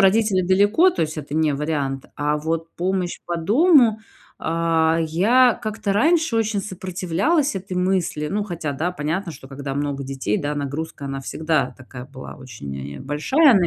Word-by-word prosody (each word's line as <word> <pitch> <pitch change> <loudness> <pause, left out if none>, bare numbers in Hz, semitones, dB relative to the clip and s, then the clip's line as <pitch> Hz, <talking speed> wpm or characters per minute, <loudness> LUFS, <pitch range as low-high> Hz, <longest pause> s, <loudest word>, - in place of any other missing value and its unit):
родители 195 0 +4
далеко, 205 - +4
то 250 - -1
есть 155 0 -3
это 145 -1 -6
не 155 -2 +2
вариант. 140 -2 -2
А 150 0 0
вот 165 +2 -3
помощь 180 0 -1
по 175 - -2
дому, 235 - +4 0.4
а, 165 0 +1
я 235 +10 +4
как-то 215 -2 -2
раньше 320 - +3
очень 220 -2 +1
сопротивлялась 190 - 0
этой 185 -1 -5
мысли. 180 -5 0
Ну 205 +4 -1
хотя 170 -7 -4
да, 160 +6 -1
понятно, 170 +2 -3
что 130 -2 -12
когда 135 0 -5
много 140 -1 -2
детей, 135 -6 -2
да, 145 0 -2
нагрузка 145 +1 -4
она 135 0 -4
всегда 145 -3 -1
такая 130 -1 -10
была 130 -1 -10
очень, 70 - -8
э, - - -9
большая 230 - +4
на 185 -4 +4
165 Hz, 165 wpm, -22 LUFS, 145-200 Hz, 0.4 s, родители